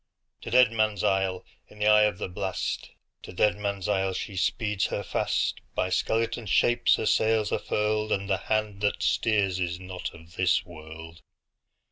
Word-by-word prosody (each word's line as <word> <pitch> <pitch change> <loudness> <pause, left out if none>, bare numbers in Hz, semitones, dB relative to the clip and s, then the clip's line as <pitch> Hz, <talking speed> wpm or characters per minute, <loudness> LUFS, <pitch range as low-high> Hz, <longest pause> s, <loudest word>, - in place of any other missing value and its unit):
To - - -7
Deadman's 110 -5 +3
Isle, 95 -1 0 0.2
in 105 - -17
the 105 - -1
eye 105 0 +6
of 105 -4 -1
the - - -4
blast, 95 0 -3 0.3
To - - -10
Deadman's 100 0 0
Isle, 95 -2 +1
she 100 - -5
speeds 105 +1 0
her - - -3
fast; - - -1
By 95 - 0
skeleton 115 +3 -1
shapes 120 +6 +3
her - - -3
sails 110 -1 +2
are - - 0
furled, 105 0 -1
And 100 0 0
the 95 -2 +1
hand 110 -2 0
that 105 - 0
steers 100 -4 +1
is 85 -1 -2
not 90 -1 -6
of 85 +1 -16
this 90 +2 +2
world! 80 -1 -11
100 Hz, 165 wpm, -27 LUFS, 95-110 Hz, 0.3 s, eye